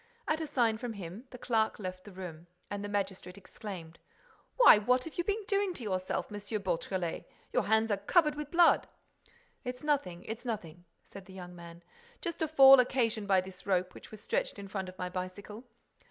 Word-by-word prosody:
At 310 +1 0
a 320 - -3
sign 235 -6 +1
from 245 -2 -4
him, 195 +4 -8
the 250 - -10
clerk 225 -3 0
left 185 -2 -6
the 205 - -10
room; 175 -3 -8 0.2
and 205 0 -3
the 205 - -4
magistrate 190 -2 -3
exclaimed: 180 -4 -9 0.6
"Why, 485 - +9
what 250 +4 +2
have 325 - -7
you - - +2
been 415 +3 -1
doing 395 -2 0
to 245 - -5
yourself, 185 0 -2
M. 205 - -5 0.2
Beautrelet? 180 -1 -3 0.2
Your - - +3
hands 220 +1 +3
are 200 - +2
covered 300 - +3
with 295 -1 -6
blood." 340 +1 +5 0.8
"It's 250 +1 -6
nothing, 280 - -1
it's 225 +2 -6
nothing," 175 -8 -5 0.2
said 195 -2 -12
the 190 - -12
young 180 -1 -9
man. 170 0 -12 0.4
"Just 340 -4 -5
a 320 - +2
fall 270 -3 +9
occasioned 235 -4 +1
by 190 -2 +4
this 185 +1 -11
rope, 185 -1 +1
which - - -12
was 215 -1 -11
stretched - - -1
in 200 0 -7
front 195 -2 -4
of 185 - -13
my 180 - -3
bicycle. 185 +5 -6
205 Hz, 200 wpm, -31 LUFS, 185-255 Hz, 0.8 s, Why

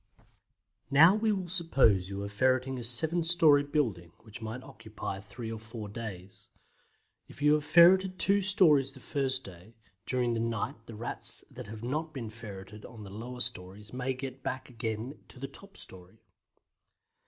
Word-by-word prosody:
Now 160 +7 +8
we 215 +1 +1
will 190 -3 -2
suppose 135 - +2
you 100 0 -4
are - - -3
ferreting 130 +4 +1
a - - -5
seven 160 +9 +4
storey 165 -3 +5
building, 120 - -1
which 110 -1 -12
might 115 +3 -5
occupy 110 -3 -7
three 110 +3 -7
or 110 - -5
four 110 -1 -8
days. 100 -4 -8 0.8
If - - -15
you 150 +1 +5
have 150 -1 +2
ferreted 185 +3 +6
two 200 +2 +3
stories 170 - +4
the 135 - -13
first 130 0 -1
day, 95 +4 -12 0.3
during 125 -2 +1
the 115 - -1
night 115 0 -3
the 115 - -8
Rats 115 +3 -4
that - - -9
have 110 +1 -8
not 155 +5 -3
been 115 -5 -5
ferreted 105 -2 -10
on 115 -3 -10
the 95 - -10
lower 120 +4 -6
stories 105 -2 -3
may 130 +1 -2
get 130 0 -7
back 130 +1 -4
again 115 +3 -4
to - - -12
the 135 - -4
top 195 +8 -14
storey. 95 +4 -11
125 Hz, 170 wpm, -30 LUFS, 110-145 Hz, 0.8 s, Now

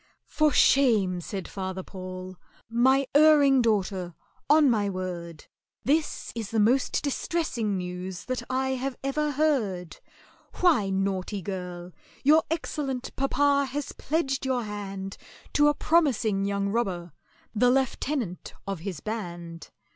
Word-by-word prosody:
"For 305 -1 +2
shame!" 215 -13 +4
said 190 +1 -5
FATHER 190 -1 -5
PAUL, 185 0 -8 0.4
"my 260 +4 +4
erring 290 -3 +6
daughter! 190 -6 0 0.3
On 300 0 +6
my 210 -5 +2
word 175 -4 -5 0.4
This 300 +3 0
is 225 -3 -4
the 225 - 0
most 245 +6 +2
distressing 270 - -1
news 180 0 -5
that 255 -1 -2
I 260 +1 0
have 265 0 -2
ever 300 +2 0
heard. 250 - 0 0.6
Why, 320 - +3
naughty 195 0 -1
girl, 180 -2 -6 0.3
your 305 +4 +6
excellent 275 -5 -3
papa 280 +1 +2
has 285 +1 -4
pledged 280 -4 -1
your 260 -2 0
hand 195 -2 -6 0.4
To 295 0 +5
a 295 - +3
promising 245 -13 +2
young 200 0 -1
robber, 190 -6 -2 0.4
the 245 +3 +4
lieutenant 260 - -1
of 195 -3 -3
his 175 -3 -6
band! 175 -7 -6
220 Hz, 125 wpm, -27 LUFS, 185-275 Hz, 0.6 s, erring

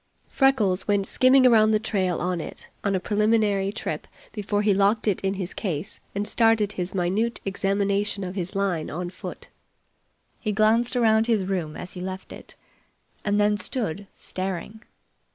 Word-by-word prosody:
Freckles 225 -9 +2
went 205 -1 +2
skimming 255 +4 +5
around 220 -3 +6
the 215 -1 +3
trail 190 -5 -1
on 180 -1 -1
it - - -8
on 200 -1 +1
a - - +1
preliminary 210 -1 +1
trip 215 - -5 0.3
before 205 0 -1
he 205 -1 +4
locked 200 +3 +2
it 200 - +1
in 195 0 -1
his 185 -2 -4
case 175 -4 -4 0.2
and 205 +1 -1
started 225 -2 +3
his 180 0 -4
minute 195 +6 0
examination 200 +1 0
of 180 0 -4
his 185 0 -4
line 190 -5 -1
on 175 +3 -4
foot. - - -9 0.9
He 215 -2 -2
glanced 225 +4 +3
around 225 -2 +3
his 220 -5 +2
room 180 -5 -2
as 180 - -6
he 180 - -7
left 190 +1 -6
it, - - -12 0.7
and 205 0 +1
then 210 0 +3
stood 205 -2 -3
staring. 190 +3 -4
200 Hz, 165 wpm, -25 LUFS, 185-215 Hz, 0.9 s, around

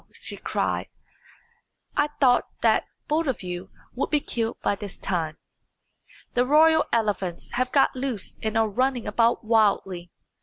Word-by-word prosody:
she - - -4
cried, - - -2 1.1
"I 295 - +3
thought 250 -3 +4 0.2
that - - +3 0.2
both 310 +1 +1
of 260 -7 -2
you 180 +1 -5 0.2
would 250 - -2
be 300 - +3
killed 230 -4 -3
by - - +2
this 200 -1 -7
time. 160 -4 -2 1.0
The 245 - +3
royal 315 +4 +5
elephants 205 -6 -1
have 255 +1 -1
got 275 - +3
loose 255 -6 -2
and 220 0 -1
are 225 0 +3
running 250 +3 0
about 230 0 +2
wildly. 200 -5 +1
230 Hz, 145 wpm, -25 LUFS, 195-260 Hz, 1.1 s, royal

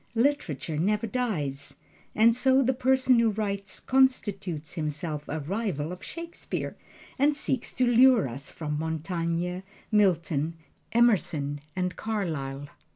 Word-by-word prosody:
Literature 225 - 0
never 210 +6 +1
dies, 175 - -2 0.4
and 225 +1 +5
so 265 +2 +4
the 260 +1 +2
person 255 -1 +3
who 230 -1 +4
writes 200 -2 -3
constitutes 205 - +1
himself 150 -1 -4
a 155 +1 -2
rival 175 -2 -2
of 180 - -8
Shakespeare 335 0 -5 0.4
and 290 +2 +4
seeks 265 -3 -2
to 255 - +3
lure 245 - +6
us 135 +3 -6
from 150 -2 -4
Montaigne, 165 +2 -2 0.3
Milton, 170 -6 +2 0.4
Emerson 160 -11 +2
and 180 -1 -1
Carlyle. 155 -10 -3
190 Hz, 120 wpm, -27 LUFS, 155-240 Hz, 0.4 s, lure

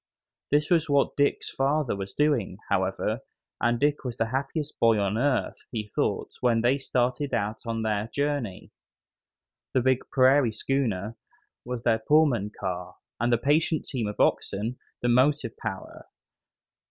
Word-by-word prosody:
This 150 +2 +2
was 165 -2 +3
what 140 -1 +2
Dick's 145 0 +1
father 140 -2 0
was 100 0 -6
doing, 145 -8 +1
however, - - 0 0.4
and 120 0 +2
Dick 145 +2 +1
was 125 -3 -5
the 115 0 0
happiest 140 +3 -3
boy 115 -1 +5
on 100 0 0
earth, 130 +3 -1
he 110 -3 -3
thought, - - -1
when 115 -2 +3
they 125 +4 +2
started 130 +1 0
out 110 -1 -2
on 115 -1 -2
their 105 -1 -1
journey. 140 -7 -3 1.0
The 130 - +4
big 130 0 +3
"prairie 130 -2 +4
schooner" 115 -5 -1 0.5
was 125 -1 -5
their 115 -2 +3
Pullman 135 -5 +3
car, 90 -1 -4 0.2
and 120 +1 +1
the 120 - +4
patient 150 +5 +1
team 120 -6 -2
of 105 - -6
oxen 110 +6 0 0.2
the - - +2
motive 130 0 +2
power. 100 -4 -7
125 Hz, 150 wpm, -27 LUFS, 110-140 Hz, 1.0 s, boy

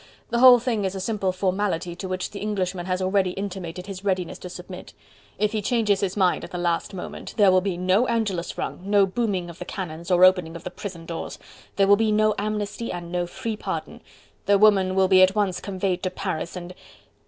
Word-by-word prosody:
The 235 - +1
whole 250 0 +9
thing 230 -3 -1
is 190 0 -2
a - - -3
simple 195 -1 -1
formality 185 -2 -1
to 190 - -5
which 185 0 -3
the 200 - -7
Englishman 190 -4 -2
has 185 0 -1
already 185 -1 +1
intimated 185 -3 -5
his 195 -1 -8
readiness 185 -3 -1
to 180 - -8
submit. 180 +1 -10 0.4
If 210 +1 +1
he 215 - -1
changes 210 -3 +1
his 195 0 -2
mind 185 -3 +2
at - - -7
the 180 - -5
last 175 +2 -1
moment 180 - -7
there 200 -3 +6
will 185 0 +4
be 190 -2 -2
no 185 +7 +2
Angelus 210 -7 -1
rung, - - -4
no 200 0 +4
booming 195 -3 -1
of 170 0 -11
the - - -4
cannons 170 -3 -6
or 180 0 +6
opening 180 -3 +3
of 170 - -8
the 180 - -6
prison 180 -4 -8
doors: 165 -1 -6 0.4
there 195 - +4
will 200 +1 +6
be 220 0 +2
no 215 0 +3
amnesty, 210 +2 -3
and 170 -1 -6
no 175 -1 -1
free 220 +5 -4
pardon. - - -5 0.5
The 200 0 +5
woman 195 -3 +4
will 190 0 +4
be 185 0 +6
at 185 +2 +5
once 200 -4 0
conveyed 190 -2 -2
to 185 - -1
Paris, 185 -3 -4
and... 180 0 -7
190 Hz, 220 wpm, -24 LUFS, 180-205 Hz, 0.5 s, whole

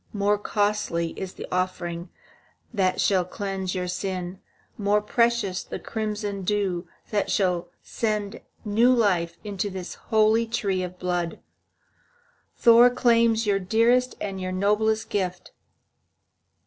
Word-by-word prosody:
More 205 0 +1
costly 205 -5 0
is 190 +2 -6
the - - -7
offering 175 -1 -2 0.6
that 190 -4 +1
shall 190 -3 +3
cleanse 190 0 -4
your 180 -1 -2
sin, 180 0 -4 0.4
more 205 0 +2
precious 225 -3 +1
the - - -6
crimson 210 -2 -3
dew 190 -3 -1 0.2
that 205 -2 0
shall 180 -3 0
send 210 -2 -2 0.2
new 225 +4 +4
life 180 -8 +2
into 205 -1 -3
this 185 -2 -6 0.2
holy 220 +1 +4
tree 200 -5 -1
of 180 0 -5
blood. 175 -2 -2 1.2
Thor 235 +1 +7
claims 230 -2 +3
your 200 -1 +2
dearest 230 +6 +2
and 195 -2 -4
your 185 0 -3
noblest 210 +3 +1
gift." 180 -3 -2
200 Hz, 120 wpm, -25 LUFS, 185-220 Hz, 1.2 s, Thor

